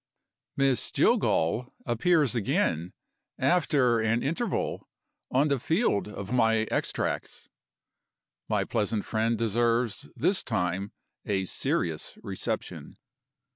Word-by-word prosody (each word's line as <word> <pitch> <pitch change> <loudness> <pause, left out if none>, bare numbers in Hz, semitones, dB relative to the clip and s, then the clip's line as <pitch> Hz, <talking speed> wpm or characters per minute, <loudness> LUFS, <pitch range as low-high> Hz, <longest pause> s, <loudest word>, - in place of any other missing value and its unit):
Miss 135 -3 +2
Jillgall 110 +11 +2
appears 145 +4 +2
again, 100 - 0 0.5
after 135 -6 +3
an 110 +2 +1
interval, 170 - -2 0.4
on 135 +4 +3
the 140 -2 +1
field 160 - +1
of 100 -1 -7
my 115 -2 +3
extracts. - - -2 1.0
My - - +2
pleasant 105 0 -1
friend 115 +1 0
deserves 115 0 0
this - - +1
time 90 +3 -1 0.3
a 95 -2 -1
serious 80 -3 -2
reception. - - -5
115 Hz, 95 wpm, -28 LUFS, 100-135 Hz, 1.0 s, after